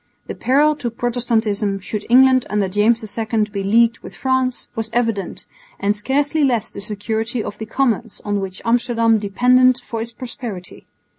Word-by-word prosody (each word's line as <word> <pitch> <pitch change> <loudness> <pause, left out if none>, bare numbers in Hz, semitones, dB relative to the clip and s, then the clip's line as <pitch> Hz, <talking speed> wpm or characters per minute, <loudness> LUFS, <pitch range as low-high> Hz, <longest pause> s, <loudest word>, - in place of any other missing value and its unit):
The - - -5
peril 295 +4 +2
to 255 -5 -3
Protestantism 230 -4 -1
should 210 +2 -5
England 260 +1 +6
under 205 -2 0
James 210 +4 +2
II 220 -1 0
be 200 -1 -3
leagued 230 +3 +3
with - - -11
France, 260 -1 -1
was 225 0 -2
evident, 230 -5 -1 0.3
and 205 +1 +1
scarcely 285 +7 0
less 240 -6 +1
the 200 - -7
security 220 +3 -2
of 205 - -7
the 220 - -5
commerce 240 -2 -1
on 205 -1 0
which 190 -1 -6
Amsterdam 230 -1 +2
depended 250 +5 +4
for 225 -1 -4
its 230 +1 -3
prosperity. 235 -6 -8
230 Hz, 160 wpm, -20 LUFS, 210-250 Hz, 0.3 s, England